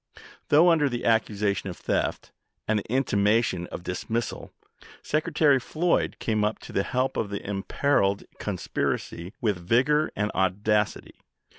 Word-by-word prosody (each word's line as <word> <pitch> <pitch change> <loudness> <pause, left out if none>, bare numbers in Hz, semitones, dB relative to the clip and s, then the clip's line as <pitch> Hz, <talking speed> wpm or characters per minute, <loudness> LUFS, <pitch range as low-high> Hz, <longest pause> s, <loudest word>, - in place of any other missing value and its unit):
Though 165 +4 +6
under 150 -4 +3
the 120 -1 -4
accusation 105 -3 +1
of 90 - -7
theft - - -2 0.4
and 110 -1 +2
the 105 - -9
intimation 105 -6 +1
of - - -8
dismissal, 110 +6 -3 0.5
Secretary 150 -2 +2
Floyd 170 +7 0
came 110 -2 0
up 105 +1 +2
"Mr. - - -21
Buck - - -31
to - - -10
the 95 - +1
help 130 +4 -1
of 105 - -1
the 100 -1 -5
imperiled 100 0 +1 0.2
conspiracy 85 +2 -3
with 105 -5 +1
vigor 130 - +2
ti, - - -15
on,"p.riOT 105 - -1
and 105 - -1
audacity. 105 +3 0
110 Hz, 155 wpm, -26 LUFS, 100-135 Hz, 0.5 s, Though